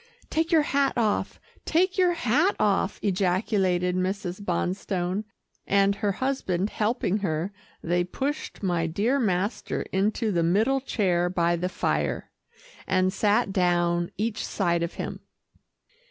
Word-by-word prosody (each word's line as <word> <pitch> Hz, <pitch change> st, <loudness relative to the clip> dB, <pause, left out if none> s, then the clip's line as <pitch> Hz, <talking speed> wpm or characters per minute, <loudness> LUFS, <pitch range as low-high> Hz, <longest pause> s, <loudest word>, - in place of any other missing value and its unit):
"Take 325 Hz, +2 st, 0 dB
your 320 Hz, -3 st, +5 dB
hat 280 Hz, -1 st, +1 dB
off, 220 Hz, -3 st, 0 dB, 0.2 s
take 365 Hz, +3 st, +2 dB
your 360 Hz, -2 st, +3 dB
hat 330 Hz, -, +2 dB
off," 200 Hz, -1 st, +1 dB
ejaculated 185 Hz, -1 st, +1 dB
Mrs. 185 Hz, 0 st, -2 dB
Bonstone, 185 Hz, +2 st, -1 dB, 0.4 s
and 200 Hz, 0 st, +4 dB
her 205 Hz, -1 st, -1 dB
husband 210 Hz, -7 st, -1 dB
helping 215 Hz, -2 st, 0 dB
her, 175 Hz, 0 st, -2 dB, 0.3 s
they 175 Hz, +1 st, +1 dB
pushed 270 Hz, +8 st, -4 dB
my 175 Hz, -3 st, +1 dB
dear 215 Hz, +12 st, +1 dB
master 200 Hz, -2 st, -1 dB
into 210 Hz, +3 st, +1 dB
the 170 Hz, -3 st, +1 dB
middle 215 Hz, +11 st, +2 dB
chair 180 Hz, -8 st, +1 dB
by 175 Hz, -1 st, +1 dB
the 180 Hz, +2 st, -2 dB
fire, -, -, -1 dB, 0.6 s
and 185 Hz, 0 st, +2 dB
sat 210 Hz, 0 st, +2 dB
down 175 Hz, -2 st, +2 dB
each 215 Hz, +1 st, -2 dB
side 170 Hz, -4 st, 0 dB
of 170 Hz, +1 st, -3 dB
him. -, -, -5 dB
195 Hz, 130 wpm, -26 LUFS, 180-225 Hz, 0.6 s, your